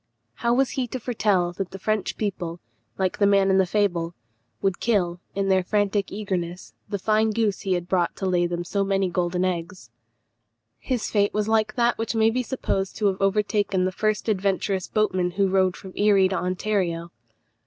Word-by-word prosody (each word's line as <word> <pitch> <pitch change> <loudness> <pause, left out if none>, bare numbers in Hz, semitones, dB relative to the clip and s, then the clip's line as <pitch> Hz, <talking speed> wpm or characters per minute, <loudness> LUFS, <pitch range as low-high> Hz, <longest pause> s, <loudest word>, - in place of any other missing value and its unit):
How 235 - +2
was 260 +2 +2
he 260 -3 -2
to 255 - -5
foretell 205 -7 +1
that 190 0 -4
the 195 - -8
French 215 +2 -1
people, 180 -5 -3 0.4
like 190 -1 -1
the 200 - +5
man 195 -1 +4
in 190 - +4
the 190 - +3
fable, 175 -4 0 0.4
would 195 -2 0
kill, 180 -6 +1 0.2
in 195 0 0
their 190 -1 +3
frantic 205 0 0
eagerness, 185 -3 -4 0.2
the 200 - -1
fine 215 +2 +2
goose 215 -2 0
he 190 - -1
had 175 -1 -2
brought 180 -2 +1
to 195 - -4
lay 175 -2 +2
them 175 0 -3
so 200 +3 -1
many 195 -1 0
golden 180 +1 0
eggs? 175 -6 -4 0.9
His 250 -4 -2
fate 205 -1 +2
was 210 0 0
like 220 -1 +1
that 240 -1 +2
which 225 0 -2
may 225 0 +4
be 255 +2 0
supposed 210 -6 -2
to 215 - -2
have 190 0 -4
overtaken 200 -1 +1
the 185 - 0
first 215 +3 -1
adventurous 195 -2 0
boatman 185 -4 +1
who 200 -1 +3
rowed 190 -1 +2
from 190 -2 -11
Erie 200 -2 +4
to 190 - -1
Ontario. 180 -2 -1
195 Hz, 190 wpm, -24 LUFS, 185-215 Hz, 0.9 s, the